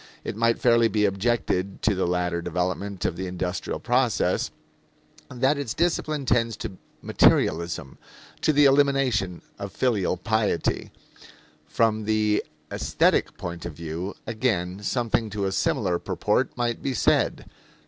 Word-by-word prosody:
It - - -4
might 115 +1 +2
fairly 115 -1 +4
be 105 -1 +1
objected 100 -2 -1
to 110 - +3
the 95 -2 0
later 90 -1 0
development 90 +3 -2
of 85 - -1
the 95 +1 -3
industrial 90 0 -3
process 120 -7 +1 0.8
that 130 +4 +1
its 135 -6 -3
discipline 155 -4 0
tends 115 -2 +1
to 95 - -7 0.2
"materialism," 85 -3 +2 0.4
to - - +3
the 145 -1 +5
elimination 135 -10 +2 0.2
of - - -5
filial 105 -8 0
piety. 105 -3 0 0.8
From 110 -2 +1
the 110 -1 +2 0.3
aesthetic - - +1
point 85 0 -6
of 85 - -7
view, 85 +5 -5
again, 105 -5 -1
something 115 0 0
to 100 -1 -2
a 95 - 0
similar 90 -2 0
purport - - -1
might 120 -1 -1
be 135 -2 -2
said. - - +2
105 Hz, 135 wpm, -25 LUFS, 90-120 Hz, 0.8 s, the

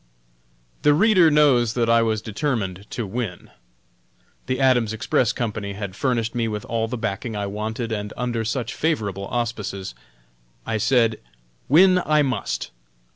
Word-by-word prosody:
The 145 0 +4
reader 185 -2 +5
knows 135 -7 +4
that 120 -2 +1
I 115 0 +5
was 110 -2 0
determined 105 -5 -3
to 120 - -4
win. 100 -3 -5 1.0
The 130 0 -1
Adams 125 -5 +3
Express 115 +1 +1
Company 105 -4 -3
had 100 -2 -6
furnished 115 -3 -1
me 120 -2 0
with 105 -1 -4
all 115 -1 -1
the 125 +2 -4
backing 110 0 -3
I 100 -1 -2
wanted, 110 +3 -4
and 105 -1 -3
under 120 -2 -1
such 115 +2 -2
favorable 100 - -1
auspices, 105 - -3 0.7
I 110 - -1
said, 115 0 +2 0.5
"Win, 180 +5 +6
I 150 -1 +3
must! 130 - -2
115 Hz, 145 wpm, -23 LUFS, 105-130 Hz, 1.0 s, Win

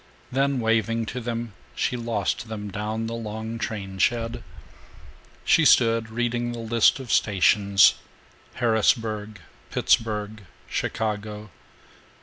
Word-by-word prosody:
Then, 135 +1 +1
waving 115 0 +1
to 125 - -3
them, 115 -2 -4 0.2
she - - -1
lost 115 -2 -2
them 105 -2 -6
down 110 +3 -3
the 115 - -4
long 110 0 -5
train 95 -4 -5
shed. 115 +2 0 1.0
She - - +4
stood 115 -1 +4
reading 120 +1 -2
the - - -6
list 115 +3 +3
of 130 -4 -6
stations: 100 0 +4 0.6
Harrisburg, 110 -3 0 0.3
Pittsburg, 105 -1 0 0.3
Chicago. 105 -2 -3
110 Hz, 110 wpm, -24 LUFS, 105-115 Hz, 1.0 s, She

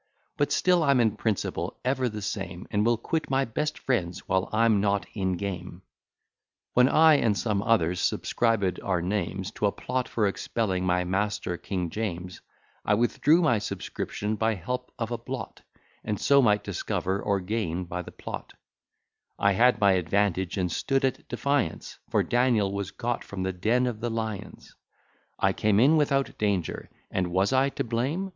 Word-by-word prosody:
But - - 0
still 180 -1 +3
I'm 140 -4 +4
in 110 -3 +2
principle 110 -4 -2
ever 130 -1 +1
the 105 -2 -6
same, 95 -3 -4
And 105 0 +2
will 120 +1 +3
quit 160 +8 -2
my 135 0 +2
best 150 +7 -2
friends, 95 -8 -2
while 95 0 +1
I'm 110 -2 +3
Not 100 0 +1
in 95 -3 -1
game. 90 -2 -5 0.9
When 125 +1 +5
I 160 -1 +6
and 105 -6 +1
some 100 +2 0
others 90 -6 +2
subscribed 110 -6 0
our 95 -3 0
names 95 0 -2
To 105 - 0
a - - +1
plot 125 +3 -3
for 110 - +1
expelling 95 -2 -1
my 90 0 +2
master 95 0 -1
King 90 -2 -3
James, 90 -5 -4 0.4
I 105 - +3
withdrew 150 +9 +3
my 120 -9 +3
subscription 105 +1 -4
by 110 +1 +1
help 125 +7 -4
of 115 -1 -3
a 120 - -2
blot, - - -6 0.4
And 105 -3 -2
so 140 0 +5
might 105 -4 +3
discover 95 +2 -2
or 100 -1 +1
gain 90 -3 -2
by 90 +1 -4
the - - -10
plot: - - -8 0.8
I 100 - +3
had 125 +6 +4
my 100 -1 +5
advantage, 95 +1 +1
and 90 -2 0
stood 135 - +1
at 130 - -3
defiance, 140 - -1
For - - +2
Daniel 120 -5 +2
was 100 -1 -3
got 120 +4 -3
from 95 -2 -5
the 95 0 -1
den 115 +8 +1
of 120 -3 -3
the 120 - -2
lions: 110 -3 -5 0.6
I - - +2
came 105 -1 +2
in 140 +7 +6
without 140 -3 +1
danger, 100 -5 -1 0.2
and 95 -1 0
was 95 +7 +1
I 135 +1 +3
to - - -3
blame? 130 +12 -1
105 Hz, 175 wpm, -27 LUFS, 95-120 Hz, 0.9 s, I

